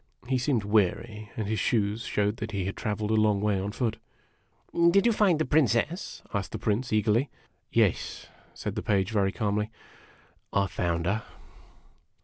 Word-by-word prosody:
He 130 Hz, 0 st, +1 dB
seemed 125 Hz, -4 st, +1 dB
weary, 105 Hz, +1 st, 0 dB
and 110 Hz, -3 st, -2 dB
his 110 Hz, 0 st, -1 dB
shoes 105 Hz, +1 st, 0 dB
showed 105 Hz, +1 st, 0 dB
that 110 Hz, +1 st, -5 dB
he 95 Hz, -2 st, -1 dB
had 95 Hz, -, -3 dB
traveled 105 Hz, 0 st, -2 dB
a -, -, +3 dB
long 105 Hz, -2 st, +3 dB
way 105 Hz, -1 st, +1 dB
on 100 Hz, +2 st, -3 dB
foot. 115 Hz, 0 st, -1 dB, 0.9 s
"Did 195 Hz, +5 st, +4 dB
you 235 Hz, -, +5 dB
find 200 Hz, -6 st, +3 dB
the 155 Hz, -, 0 dB
Princess?" 150 Hz, -, +1 dB
asked 100 Hz, -4 st, -2 dB
the -, -, -2 dB
Prince, 115 Hz, +3 st, -1 dB
eagerly. 110 Hz, +5 st, +2 dB, 0.2 s
" -, -, -44 dB
Yes," -, -, +1 dB, 0.3 s
said -, -, -4 dB
the -, -, -3 dB
Page, 100 Hz, 0 st, +1 dB
very 100 Hz, -3 st, +2 dB
calmly. 105 Hz, 0 st, -1 dB, 0.5 s
" -, -, -33 dB
I 100 Hz, 0 st, +3 dB
found 85 Hz, -3 st, -1 dB
her." 100 Hz, +5 st, +1 dB
105 Hz, 175 wpm, -28 LUFS, 100-115 Hz, 0.9 s, you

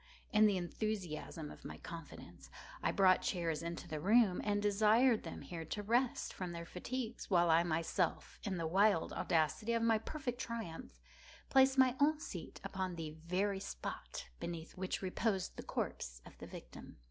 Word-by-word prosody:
In 215 Hz, 0 st, +7 dB
the 200 Hz, -2 st, +2 dB
enthusiasm 175 Hz, -5 st, -3 dB
of -, -, -13 dB
my -, -, -7 dB
confidence, 150 Hz, -, -10 dB, 0.3 s
I -, -, +2 dB
brought 185 Hz, -2 st, +5 dB
chairs 170 Hz, -4 st, -1 dB
into 170 Hz, +1 st, -5 dB
the 155 Hz, -2 st, -3 dB
room, 205 Hz, +2 st, +4 dB
and 205 Hz, -1 st, +1 dB
desired 215 Hz, +4 st, +4 dB
them -, -, -7 dB
here 170 Hz, -2 st, -6 dB
to 205 Hz, +6 st, -4 dB
rest 240 Hz, +4 st, +1 dB
from 180 Hz, -2 st, -4 dB
their 170 Hz, 0 st, -5 dB
fatigues, 235 Hz, +7 st, -5 dB
while 175 Hz, -3 st, +4 dB
I 165 Hz, +1 st, +6 dB
myself, 165 Hz, +1 st, -1 dB
in 195 Hz, -4 st, -2 dB
the 165 Hz, -, -2 dB
wild 190 Hz, +1 st, +3 dB
audacity 170 Hz, +8 st, +1 dB
of 230 Hz, 0 st, +1 dB
my 225 Hz, -1 st, +4 dB
perfect 255 Hz, 0 st, -4 dB
triumph, 210 Hz, -, -6 dB, 0.5 s
placed 265 Hz, 0 st, +5 dB
my 260 Hz, -1 st, +5 dB
own 300 Hz, +1 st, +4 dB
seat -, -, -7 dB
upon 185 Hz, -2 st, -3 dB
the 160 Hz, -2 st, -4 dB
very 180 Hz, +5 st, -1 dB
spot -, -, -6 dB
beneath 170 Hz, -1 st, -5 dB
which 185 Hz, +1 st, -3 dB
reposed 190 Hz, 0 st, 0 dB
the -, -, -6 dB
corpse -, -, -3 dB
of -, -, -13 dB
the -, -, -8 dB
victim. -, -, -10 dB
190 Hz, 170 wpm, -36 LUFS, 170-220 Hz, 0.5 s, In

